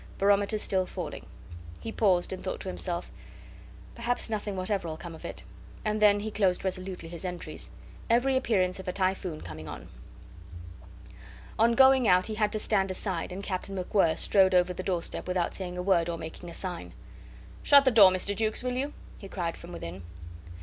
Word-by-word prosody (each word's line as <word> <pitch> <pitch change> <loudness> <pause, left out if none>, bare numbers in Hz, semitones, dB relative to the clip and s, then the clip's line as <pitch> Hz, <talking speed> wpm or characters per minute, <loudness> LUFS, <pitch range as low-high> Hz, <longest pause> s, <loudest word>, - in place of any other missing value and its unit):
Barometer 200 +1 +3
still 190 -3 0
falling." - - -6 0.5
He 225 - -6
paused, 190 -5 +2
and 185 - -7
thought 185 - -3
to - - -5
himself, 175 -2 -3 0.8
"Perhaps 235 -1 -2
nothing 210 -2 -2
whatever'll 185 -4 -2
come 170 0 -8
of 160 - -12
it." - - -7 0.4
And 215 0 0
then 205 -1 +5
he 220 +1 -4
closed 195 -3 +1
resolutely 185 -2 -3
his 170 +1 -7
entries: 180 -1 -6 0.4
"Every 245 +3 +3
appearance 195 -8 +1
of 190 - -9
a - - 0
typhoon 185 -3 -1
coming 80 -2 -8
on." - - -8 1.7
On 230 +1 +5
going 265 -2 +6
out 180 -1 +5
he 220 - -3
had 210 -1 +1
to - - +1
stand 195 -2 +1
aside, 185 -2 -3
and 190 +2 -6
Captain 195 0 -3
MacWhirr 180 -3 +2
strode 190 -2 +4
over 180 0 +3
the 180 - -5
doorstep 185 -2 -3
without 180 -1 0
saying 180 -2 -5
a 180 - -2
word 175 -3 +2
or 170 - -2
making 160 +2 -8
a - - -9
sign. 175 - -5 0.7
"Shut 280 -1 +7
the 260 - +5
door, 210 -5 +9
Mr. 185 +2 -1
Jukes, 220 +3 0
will 250 0 -1
you?" 275 +4 -2 0.3
he 195 - -10
cried 170 -4 -3
from 170 - -11
within. 90 - -7
190 Hz, 185 wpm, -28 LUFS, 180-210 Hz, 1.7 s, door